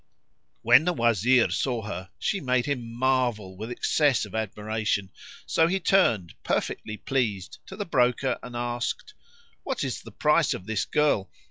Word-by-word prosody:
When 150 - +6
the 180 - +2
Wazir 120 - +3
saw 120 -4 -1
her 95 -2 -6
she 200 - -1
made 125 -3 +1
him 125 -5 -3
marvel 120 -6 0
with 110 +4 -7
excess 135 0 +2
of - - -13
admiration, 105 -2 -2 0.3
so 165 - +3
he 190 +3 0
turned, 115 - +2
perfectly 110 0 -2
pleased, 110 -9 -2
to 190 - -8
the 205 0 -4
broker 125 -4 +1
and 125 -1 -9
asked, 120 - -3 0.5
"What - - -3
is - - -3
the - - -12
price 150 0 +2
of 90 - -9
this 110 -1 -1
girl?" 150 -10 +1
120 Hz, 155 wpm, -26 LUFS, 110-140 Hz, 0.5 s, When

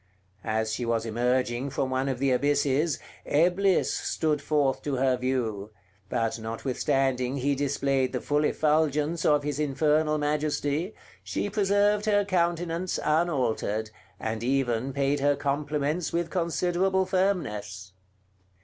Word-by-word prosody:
As 110 -1 -1
she 120 - -3
was 115 -1 0
emerging 120 +3 0
from 135 -1 -2
one 130 +1 0
of 130 - -2
the 135 +1 +1
abysses, 145 +3 +1 0.3
Eblis 180 +5 +3
stood 150 -3 -1
forth 145 -3 +1
to 145 -2 -2
her 130 0 +2
view; 120 -5 -2 0.4
but 115 +1 -1
notwithstanding 130 +3 -1
he 140 +2 +1
displayed 135 -1 0
the 125 - -2
full 145 +3 0
effulgence 155 +1 +1
of 150 -1 +3
his 145 0 -3
infernal 150 +1 +2
majesty, 150 +4 -1 0.3
she 205 - -3
preserved 205 +1 +2
her 205 -1 +3
countenance 175 -1 0
unaltered, 130 -9 0 0.3
and 110 0 -3
even 130 -1 0
paid 140 +1 0
her 145 +1 +3
compliments 145 +3 -1
with 170 -1 -1
considerable 180 +2 +1
firmness. 105 - -2
145 Hz, 125 wpm, -27 LUFS, 125-160 Hz, 0.4 s, Eblis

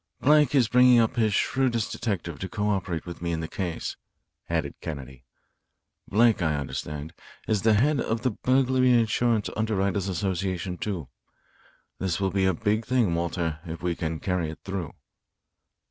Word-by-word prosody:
"Blake 150 -1 +4
is 125 -5 +4
bringing 125 +1 +6
up 115 +1 +3
his 110 -3 +2
shrewdest 120 +2 +1
detective 85 - -3
to 95 - -5
co 105 -1 -1
operate 95 -5 -2
with 85 -1 -8
me 85 0 -1
in 80 - -1
the 80 - -3
case," 85 -1 -4 0.5
added 80 -4 -1
Kennedy. 65 -4 -7 0.8
"Blake, 115 0 +3
I 80 -3 +1
understand, 75 +2 -5 0.3
is 105 -3 +1
the 110 +1 +4
head 140 +6 +3
of 115 +1 -2
the 130 - +2
Burglary 130 +2 +3
Insurance 115 -1 +1
Underwriters' 100 -3 0
Association, 95 -1 -2
too. 90 -10 -4 0.9
This 95 -2 -1
will 95 -1 0
be 95 -1 +1
a 95 - +3
big 110 +3 0
thing, 115 -7 +1
Walter, 85 -1 -2
if 85 -1 -7
we 90 -1 0
can 80 -2 -3
carry 90 -4 -1
it 80 - -7
through." 95 -6 -4
95 Hz, 160 wpm, -26 LUFS, 85-115 Hz, 0.9 s, bringing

